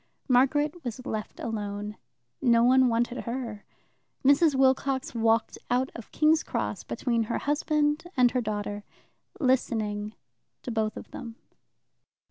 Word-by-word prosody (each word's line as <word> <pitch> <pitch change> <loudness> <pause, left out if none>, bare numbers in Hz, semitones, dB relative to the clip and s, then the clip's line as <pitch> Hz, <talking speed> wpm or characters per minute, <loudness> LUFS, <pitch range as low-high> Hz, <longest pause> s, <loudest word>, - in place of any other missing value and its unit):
Margaret 290 +6 +2
was 245 0 -6
left 215 -1 -5
alone. 210 -2 -4 0.5
No 235 -2 +4
one 260 +1 +5
wanted 240 +1 0
her. 235 -4 -5 0.6
Mrs. 285 +2 +5
Wilcox 265 0 +2
walked 225 -1 +1
out 250 +2 +1
of 230 - -10
King's 315 +1 +4
Cross - - -3
between 235 -3 -1
her 235 - -2
husband 295 +1 0
and 245 -1 +5
her 250 - 0
daughter, 205 -1 -3 0.6
listening 220 -6 0 0.5
to 245 - -4
both 220 -1 -1
of - - -10
them. 230 -2 -8
245 Hz, 125 wpm, -27 LUFS, 220-270 Hz, 0.6 s, one